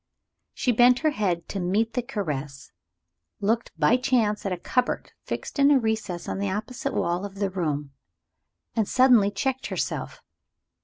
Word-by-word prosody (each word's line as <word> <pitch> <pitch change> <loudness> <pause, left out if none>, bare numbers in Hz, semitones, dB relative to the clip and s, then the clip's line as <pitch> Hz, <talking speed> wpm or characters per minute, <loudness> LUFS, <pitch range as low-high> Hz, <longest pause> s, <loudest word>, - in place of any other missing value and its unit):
She 250 - +1
bent 245 +2 +5
her 310 - +5
head 180 - -1
to 200 - -3
meet 205 +6 0
the 250 - 0
caress 150 - -5 0.7
looked 225 +3 0
by 245 - +4
chance 235 -6 +1
at - - -2
a 180 - -1
cupboard 250 +8 -1
fixed - - -5
in 280 0 +6
a 290 - +6
recess 220 -7 -2
in - - -3
the 200 0 -1
opposite 245 +8 -3
wall 175 +2 0
of 200 -1 -6
the 200 -1 -1
room 150 -6 -2 0.8
and 220 -3 +1
suddenly 250 -6 +5
checked 265 +5 -2
herself. - - -4
210 Hz, 160 wpm, -25 LUFS, 185-250 Hz, 0.8 s, in